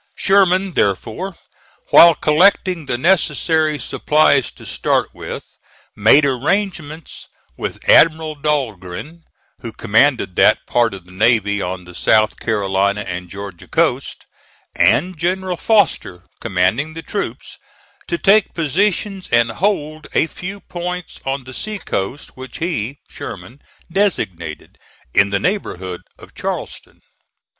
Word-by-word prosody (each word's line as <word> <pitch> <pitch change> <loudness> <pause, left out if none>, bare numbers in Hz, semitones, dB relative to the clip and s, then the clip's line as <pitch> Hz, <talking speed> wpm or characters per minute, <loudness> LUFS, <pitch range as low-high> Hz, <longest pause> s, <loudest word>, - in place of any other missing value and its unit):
Sherman, 190 -1 +3
therefore, 120 - -1 0.5
while 170 -1 +8
collecting 175 +1 +2
the 120 - -1
necessary 155 -1 +1
supplies 145 -1 +2
to - - -14
start - - 0
with, - - -7 0.5
made 125 +8 +5
arrangements 155 - -2 0.3
with - - -6
Admiral 160 -1 +5
Dahlgren, 145 - -3 0.4
who 115 - -7
commanded 115 -2 +1
that - - +4
part 120 -4 +1
of 95 -2 -12
the 90 - -17
navy 105 0 +2
on 90 0 -4
the 90 - -12
South 110 +4 +2
Carolina 100 -2 0
and 90 -2 -6
Georgia 100 -2 -9
coast, - - -1 0.5
and 180 -2 +2
General 185 +1 -1
Foster, 170 - +1 0.2
commanding 115 +10 0
the 165 - -7
troops, 200 - -5 0.5
to 345 - -1
take 210 - +3
positions, 190 +4 -1
and 120 -1 +3
hold 155 - -2
a - - +4
few 190 +5 -8
points 180 0 -6
on 135 0 -2
the 130 +1 -11
sea 215 +9 -4
coast, 125 - -4
which 130 0 -9
he 140 - -3
(Sherman) 130 +5 -9 0.3
designated, 95 - -2 0.3
in 100 - +4
the 100 0 0
neighborhood 95 - -3 0.2
of - - -15
Charleston. - - -6
145 Hz, 120 wpm, -18 LUFS, -, 0.5 s, while